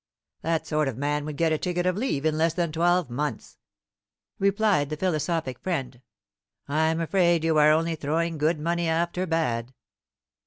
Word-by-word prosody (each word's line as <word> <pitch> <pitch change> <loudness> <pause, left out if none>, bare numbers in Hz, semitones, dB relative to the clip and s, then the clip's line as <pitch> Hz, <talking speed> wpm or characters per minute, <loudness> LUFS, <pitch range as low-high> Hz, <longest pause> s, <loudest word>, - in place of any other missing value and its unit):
"That 165 -1 -1
sort 150 -2 0
of 130 -4 -4
man 145 +1 -1
would 150 -2 -6
get 165 0 +2
a 155 - +1
ticket 175 0 -1
of 185 -1 +1
leave 200 - -1
in 155 -1 +2
less 165 +1 +1
than 170 -3 0
twelve 175 -1 +1
months," 145 +4 -4 0.8
replied 200 -6 +2
the 155 - -4
philosophic 160 -6 -1
friend. 135 -9 -3 0.7
"I'm 160 +3 +1
afraid 170 -1 +2
you 160 -1 +3
are 150 0 +6
only 165 +2 +2
throwing 160 +2 -1
good 155 +1 +1
money 170 +2 -1
after 170 +3 0
bad." 130 -7 -1
160 Hz, 165 wpm, -26 LUFS, 150-170 Hz, 0.8 s, are